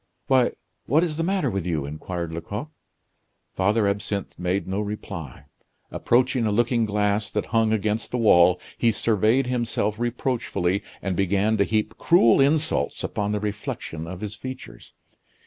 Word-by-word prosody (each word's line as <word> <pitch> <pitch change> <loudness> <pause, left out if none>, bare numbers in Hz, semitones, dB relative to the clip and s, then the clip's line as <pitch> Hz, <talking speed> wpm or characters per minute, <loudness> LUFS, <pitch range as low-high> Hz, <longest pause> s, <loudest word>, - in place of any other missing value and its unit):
"Why! 130 -2 +3 0.3
what 155 +6 +4
is 155 -4 -2
the - - 0
matter 190 +2 0
with 95 -2 -2
you?" 80 -5 -2
inquired 80 +3 -5
Lecoq. 105 - -5 0.8
Father 105 +2 +2
Absinthe 100 0 -3
made 90 +2 -1
no 95 +2 -2
reply. 100 - -6 0.5
Approaching 125 0 +2
a - - +1
looking 120 +2 +2
glass 105 0 0
that 105 - -2
hung 115 -1 +3
against 110 0 0
the 125 - -2
wall, 90 -6 +5 0.2
he 115 - +4
surveyed 110 +4 +2
himself 115 -3 -1
reproachfully 120 -6 -1 0.2
and 95 -2 -1
began 100 +3 +1
to 100 - +4
heap 110 0 -1
cruel 140 -8 +5
insults 145 - +1
upon 105 0 -2
the 105 - 0
reflection 100 -6 -5
of 95 +2 -7
his 105 -1 -4
features. 130 +4 -9
105 Hz, 150 wpm, -24 LUFS, 95-120 Hz, 0.8 s, wall